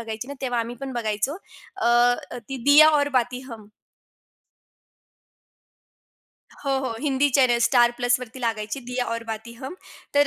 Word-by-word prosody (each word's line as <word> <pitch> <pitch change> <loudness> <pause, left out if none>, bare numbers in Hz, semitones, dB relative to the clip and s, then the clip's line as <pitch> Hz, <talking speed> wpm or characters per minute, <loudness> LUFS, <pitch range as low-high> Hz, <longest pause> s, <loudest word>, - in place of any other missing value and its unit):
बघायची 225 +2 -6
ना 280 - -6
तेव्हा 245 -3 -1
आम्ही 230 +1 -5
पण 270 -1 -5
बघायचो, 220 +4 -2 0.4
अ, - - -1
अ, 245 +1 +2
ती 270 - -4
"दिया 295 +2 +8
और 290 -2 +2
बाती 250 +1 -3
हम." 215 -3 -10 3.0
हो, 275 - -1
हो, 255 - -2
हिंदी 285 0 +1
चॅनेल 245 -3 +4
"स्टार 240 -2 +4
प्लसवरती" 245 0 -1
लागायची 225 +1 -3
"दिया 250 0 -3
और 230 - -5
बाती 220 +2 -8
हम" 265 +6 -8 0.4
तर 285 0 +5
245 Hz, 145 wpm, -24 LUFS, 230-270 Hz, 3.0 s, दिया